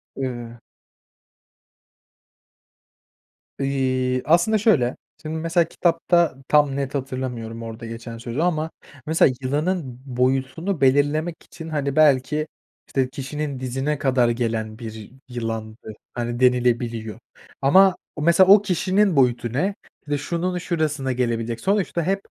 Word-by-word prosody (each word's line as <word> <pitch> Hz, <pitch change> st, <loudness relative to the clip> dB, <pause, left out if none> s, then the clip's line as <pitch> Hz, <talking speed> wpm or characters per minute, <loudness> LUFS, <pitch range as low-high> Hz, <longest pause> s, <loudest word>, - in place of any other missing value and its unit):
Iıı 120 Hz, -3 st, -5 dB, 3.0 s
İii, 130 Hz, -2 st, 0 dB
aslında 175 Hz, +8 st, +4 dB
şöyle; 170 Hz, -, +2 dB, 0.3 s
şimdi 155 Hz, +1 st, -4 dB
mesela 165 Hz, +1 st, +1 dB
kitapta 170 Hz, -1 st, +2 dB
tam 145 Hz, -2 st, +3 dB
net 140 Hz, 0 st, -3 dB
hatırlamıyorum 125 Hz, -4 st, -4 dB
orada 115 Hz, +1 st, -7 dB
geçen 115 Hz, 0 st, -7 dB
sözü 120 Hz, +4 st, -4 dB
ama 160 Hz, -2 st, 0 dB, 0.3 s
mesela 155 Hz, -4 st, +3 dB
yılanın 145 Hz, -1 st, -2 dB
boyutunu 135 Hz, +7 st, -1 dB
belirlemek 145 Hz, +5 st, +2 dB
için, 165 Hz, -1 st, -10 dB
hani, 140 Hz, -3 st, -2 dB
belki, 150 Hz, 0 st, +3 dB, 0.4 s
işte, 130 Hz, -2 st, 0 dB
kişinin 140 Hz, +1 st, -5 dB
dizine 135 Hz, +4 st, -2 dB
kadar 130 Hz, -3 st, +2 dB
gelen 115 Hz, -2 st, -2 dB
bir 110 Hz, -3 st, -8 dB, 0.2 s
yılandı, 115 Hz, -2 st, -5 dB, 0.2 s
hani, 120 Hz, 0 st, -3 dB
denilebiliyor. 120 Hz, -3 st, +1 dB, 0.4 s
Ama 190 Hz, +7 st, +6 dB, 0.3 s
mesela 170 Hz, +4 st, +5 dB
o 205 Hz, -, +6 dB
kişinin 190 Hz, 0 st, +1 dB
boyutu 120 Hz, -3 st, +2 dB
ne, 190 Hz, +10 st, 0 dB, 0.3 s
işte, 145 Hz, 0 st, 0 dB
şunun 175 Hz, +5 st, -2 dB
şurasına 155 Hz, -6 st, -1 dB
gelebilecek. 115 Hz, -2 st, -1 dB
Sonuçta 195 Hz, -4 st, 0 dB
hep 195 Hz, +4 st, 0 dB
135 Hz, 115 wpm, -23 LUFS, 120-160 Hz, 3.0 s, Ama